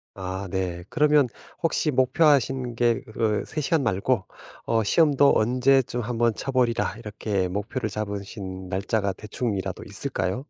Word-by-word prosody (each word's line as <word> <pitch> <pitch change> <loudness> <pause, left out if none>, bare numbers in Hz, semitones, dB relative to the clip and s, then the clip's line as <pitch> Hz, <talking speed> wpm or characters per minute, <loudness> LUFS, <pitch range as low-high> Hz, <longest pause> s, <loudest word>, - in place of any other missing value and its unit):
아 95 0 -5
네. 90 -2 -3
그러면 150 -4 +3 0.3
혹시 160 -1 +1
목표하신 130 -2 +2
게 120 -1 +1
그 110 -1 -1
3 155 - -4
시간 155 +1 +1
말고 100 +1 +1 0.4
어 115 -1 +2
시험도 145 +4 +4
언제쯤 125 +2 +2
1 115 0 -3
번 115 -2 +3
쳐 135 - -4
보리라 125 -3 +1
이렇게 105 -4 -2
목표를 105 +5 -3
잡으신 100 -2 -5
날짜가 100 +1 -1
대충이라도 105 -2 -4
있을까요? 95 +8 -3
115 Hz, 285 characters per minute, -25 LUFS, 100-130 Hz, 0.4 s, 시험도